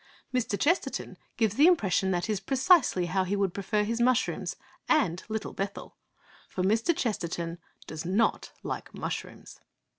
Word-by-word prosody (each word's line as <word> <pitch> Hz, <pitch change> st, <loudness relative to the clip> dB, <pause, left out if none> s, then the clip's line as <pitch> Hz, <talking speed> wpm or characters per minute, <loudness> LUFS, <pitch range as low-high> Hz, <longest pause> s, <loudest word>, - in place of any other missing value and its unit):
Mr. 230 Hz, -5 st, 0 dB
Chesterton 340 Hz, +5 st, 0 dB, 0.2 s
gives 220 Hz, -3 st, +1 dB
the 300 Hz, +4 st, +7 dB
impression 195 Hz, -, +3 dB
that 175 Hz, -2 st, 0 dB
that -, -, -4 dB
is 210 Hz, -, 0 dB
precisely 260 Hz, -, +3 dB
how 185 Hz, +2 st, +1 dB
he 190 Hz, +2 st, -1 dB
would 195 Hz, -3 st, 0 dB
prefer 210 Hz, +2 st, 0 dB
his 230 Hz, +3 st, -1 dB
mushrooms 255 Hz, +1 st, +1 dB, 0.3 s
and 185 Hz, -, +2 dB
Little 220 Hz, 0 st, -3 dB
Bethel! 200 Hz, +1 st, -5 dB, 0.5 s
For 185 Hz, -, -3 dB
Mr. 225 Hz, -, +2 dB
Chesterton 170 Hz, -6 st, -2 dB, 0.3 s
does 155 Hz, 0 st, -6 dB
not 195 Hz, +6 st, +1 dB
like -, -, -5 dB
mushrooms. -, -, -6 dB
205 Hz, 150 wpm, -28 LUFS, 185-245 Hz, 0.5 s, the